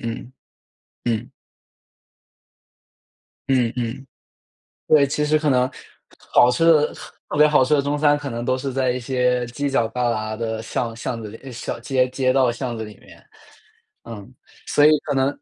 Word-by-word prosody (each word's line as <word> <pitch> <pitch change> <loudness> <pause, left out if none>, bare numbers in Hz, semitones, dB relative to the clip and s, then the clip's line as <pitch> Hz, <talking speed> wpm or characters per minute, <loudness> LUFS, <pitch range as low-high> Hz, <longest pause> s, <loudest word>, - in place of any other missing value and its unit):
嗯， 115 +2 -6 0.7
嗯。 120 +2 -2 2.2
嗯 125 -4 +2
嗯。 125 +3 -4 0.8
对， 145 -2 +5
其 150 +2 -1
实 155 +1 +3
可 150 -1 0
能 125 -1 +2 0.6
好 125 - +6
吃 165 +7 +1
的 155 -2 +4 0.4
特 150 - -3
别 150 - +7
好 150 -3 +4
吃 140 +4 +1
的 140 - +4
中 145 +1 -1
餐 145 0 +3
可 145 -1 -6
能 120 -1 -4
都 130 0 +1
是 135 +1 -4
在 130 -2 +1
一 125 - -3
些 125 0 0
犄 140 +4 -3
角 120 -4 +1
旮 125 -1 0
旯 110 0 -4
的 110 -1 -3
巷 115 0 -3
巷 115 0 -4
子 105 - -7
里， 125 +5 -11
小 120 - -5
街 125 +1 +1
街 130 0 +1
道 130 -3 +3
巷 120 -1 -4
子 110 - -4
里 105 -1 -11
面。 - - -18 0.8
嗯， 115 +1 -10 0.3
所 145 - +4
以 150 - +8
可 145 - -2
能， 135 0 +2
130 Hz, 185 characters per minute, -22 LUFS, 115-140 Hz, 2.2 s, 以